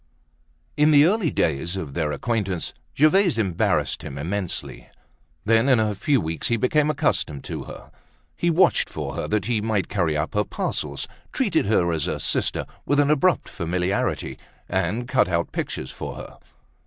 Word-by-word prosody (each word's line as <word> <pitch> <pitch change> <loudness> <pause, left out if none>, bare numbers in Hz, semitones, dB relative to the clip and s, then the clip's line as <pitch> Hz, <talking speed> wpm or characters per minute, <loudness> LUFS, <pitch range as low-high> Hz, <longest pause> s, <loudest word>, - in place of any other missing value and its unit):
In 150 +1 +4
the 145 -1 +7
early 195 -1 +2
days 80 - 0
of 80 -7 -5
their 80 -2 -1
acquaintance, 95 0 -2 0.2
Gervaise 165 - +4
embarrassed 95 -6 +1
him 70 - -7
immensely. 90 +5 -4 0.6
Then 115 +4 +4
in 130 -4 +5
a 110 -1 +1
few 135 +7 +1
weeks 80 -3 -2
he 120 - +2
became 150 +6 +2
accustomed 75 - 0
to - - -5
her. - - -11 0.4
He 170 - 0
watched 170 +3 +3
for - - -5
her - - -3
that 105 -3 0
he 115 -2 0
might 105 -3 -1
carry 85 -6 0
up 75 +6 -2
her 105 -1 +2
parcels, 100 - -3 0.2
treated 195 - +1
her 90 -5 +2
as 80 -3 -1
a - - -2
sister, - - -1 0.2
with 145 - +1
an 145 0 +4
abrupt 175 +5 +2
familiarity, 90 +2 -2 0.3
and 95 +6 -1
cut 130 -1 +3
out 85 -1 0
pictures 65 - -4
for - - -6
her. - - -10
105 Hz, 165 wpm, -24 LUFS, 85-145 Hz, 0.6 s, the